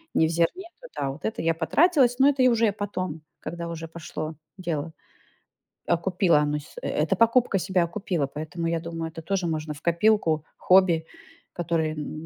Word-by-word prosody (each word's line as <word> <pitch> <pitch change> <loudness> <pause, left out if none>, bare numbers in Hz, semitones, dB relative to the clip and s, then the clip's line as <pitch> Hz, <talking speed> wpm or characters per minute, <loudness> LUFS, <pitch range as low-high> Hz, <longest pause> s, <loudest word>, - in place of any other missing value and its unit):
не 160 - +4
в - - -3
зерне, 170 - 0
то - - -10
да, 135 -1 -1
вот 140 +2 -11
это 220 - -2
я 165 0 +2
потратилась, 250 - +3
но 270 +2 +7
это 275 -2 +1
я 255 - +6
уже 230 -1 +3
и 205 - +2
потом, 185 -6 -4 0.2
когда 170 0 -6
уже 165 -1 -6
пошло 160 -1 -6 0.2
дело, 165 -3 -3 0.9
окупила 175 -1 +2
оно 150 0 0
с 150 - -15
эта 160 +6 0
покупка 230 0 +3
себя 185 -1 +1
окупила. 175 -4 -2
Поэтому 155 +4 -5
я 165 0 0
думаю, 165 -1 -5
это 165 - -8
тоже 185 0 -1
можно 155 -1 -3
в 145 - -13
копилку 170 -3 +2
хобби, 180 -3 +4 0.5
которое 165 -2 -1
м 155 +1 -6
170 Hz, 180 wpm, -25 LUFS, 160-195 Hz, 0.9 s, но